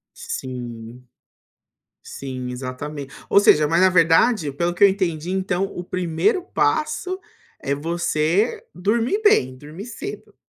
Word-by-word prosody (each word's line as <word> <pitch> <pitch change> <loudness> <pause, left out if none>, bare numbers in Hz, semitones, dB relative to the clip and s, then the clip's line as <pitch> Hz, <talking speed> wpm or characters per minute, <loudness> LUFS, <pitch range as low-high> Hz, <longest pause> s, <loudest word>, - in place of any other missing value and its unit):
Sim, 120 -1 -7 1.0
sim, 130 -2 -6
exatamen 135 +3 -6 0.2
ou 200 - +6
seja 150 -7 +5
mas 170 +3 +2
na 185 - +6
verdade, 165 +1 +3
pelo 170 +5 -1
que 175 - +2
eu - - +10
entendi 175 -3 -2
então 190 0 0
o 185 -2 -7
1º 185 - 0
passo 350 +2 -1 0.4
é 140 - -2
você 170 - 0
dormir 230 - 0
bem, 130 - +3
dormir 155 - -9
cedo. 355 - -8
170 Hz, 125 wpm, -22 LUFS, 140-205 Hz, 1.0 s, eu